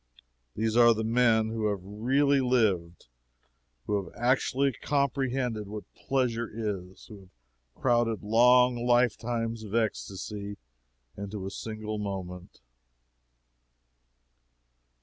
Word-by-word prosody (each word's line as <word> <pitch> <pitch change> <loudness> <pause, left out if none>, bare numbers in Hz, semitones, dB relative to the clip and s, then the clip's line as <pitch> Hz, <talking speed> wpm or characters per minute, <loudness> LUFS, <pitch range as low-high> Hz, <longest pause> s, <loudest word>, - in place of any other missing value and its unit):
These 110 +1 -1
are 120 -1 +6
the 110 - -2
men 115 -1 +3
who 110 -1 -1
have 100 -3 -2
really 135 +8 +1
lived 105 -10 +1 0.8
who 105 -2 0
have 85 - -12
actually 130 +2 +1
comprehended 130 -4 -1
what 105 +1 -6
pleasure 120 -4 -1
is 100 -4 -5
who 105 -4 -12
have 95 -1 -18 0.5
crowded 120 -3 +1
long 120 +2 +4
lifetimes 115 -1 +1
of 105 0 -6
ecstasy 100 -2 -3 0.6
into 100 -1 -6
a 95 - -5
single 110 0 -5
moment. 95 -5 -6
110 Hz, 105 wpm, -28 LUFS, 105-125 Hz, 0.8 s, are